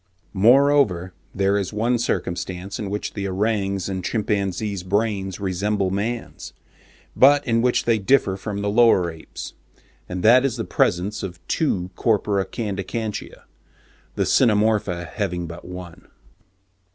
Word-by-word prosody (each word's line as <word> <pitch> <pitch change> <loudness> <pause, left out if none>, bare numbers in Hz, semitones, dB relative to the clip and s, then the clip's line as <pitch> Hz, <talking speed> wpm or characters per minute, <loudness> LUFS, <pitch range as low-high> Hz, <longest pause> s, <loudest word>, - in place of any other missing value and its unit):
Moreover, 115 -4 +4 0.2
there 100 +1 +2
is 95 - -3
one 115 +3 0
circumstance 95 -1 -3
in 105 -3 -4
which 105 +1 -4
the 100 -2 -3
orang's 100 -1 -1
and 95 -2 -4
chimpanzee's 100 -1 -1
brains 100 0 -1
resemble 100 0 -1
man's, 115 +5 -4 0.6
but 145 +2 +5
in 115 -1 +2
which 125 0 +1
they 115 -2 +2
differ 100 -2 +2
from 100 +1 -5
the 100 - 0
lower 105 -6 +4
apes, 80 -1 -9 0.6
and 90 0 -4
that 125 +4 +6
is 135 -4 0
the 115 - -2
presence 95 +5 0
of 90 -2 -6
two 95 - -1
corpora 105 -3 +1
candicantia—the 105 0 -5 0.8
Cynomorpha 105 -6 +2
having 90 +1 -3
but 85 +1 -9
one. 90 -1 -10
100 Hz, 125 wpm, -22 LUFS, 95-110 Hz, 0.8 s, that